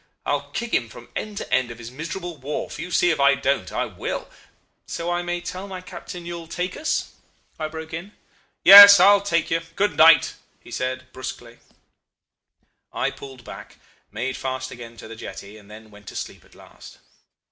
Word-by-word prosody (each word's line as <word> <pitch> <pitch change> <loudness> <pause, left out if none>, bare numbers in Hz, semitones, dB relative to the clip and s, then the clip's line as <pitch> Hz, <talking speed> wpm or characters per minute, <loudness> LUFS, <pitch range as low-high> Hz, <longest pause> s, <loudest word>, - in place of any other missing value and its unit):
I'll - - -2
kick 235 -1 -5
him 115 - +1
from 120 +2 -13
end 210 -1 -5
to - - -5
end 130 -2 +2
of 120 - -9
his 120 0 -10
miserable 165 +5 -6
wharf. 140 +3 -5
You'll 180 - -6
see 175 0 +3
if 160 - -2
I 140 0 +5
don't. 140 +1 -1
I - - -1
will - - -6 0.3
' - - -45
"'So 170 +1 -4
I 175 0 -1
may 175 0 -3
tell 185 +3 -7
my 190 -2 -7
captain 180 -1 -9
you'll 170 -1 -7
take 180 +2 -4
us?' 315 +1 -2 0.5
I 155 - -2
broke 160 0 -9
in. 180 +6 -7 0.5
"'Yes, 200 0 +12
I'll 200 +2 +6
take 170 -5 -1
you. 165 0 +1
Good 200 -7 0
night,' 160 0 +6 0.3
he - - -16
said, 130 0 -3
brusquely. 120 -2 -8 1.3
"I - - -1
pulled 130 -3 -12
back, - - -11 0.3
made 125 +5 -3
fast 130 -1 -4
again 115 -1 -11
to 110 - -11
the 115 - -10
jetty, 105 -2 -9
and 105 -1 -16
then 110 0 -13
went 105 0 -17
to - - -9
sleep - - -7
at - - -23
last. - - -15
155 Hz, 190 wpm, -23 LUFS, 125-175 Hz, 1.3 s, Yes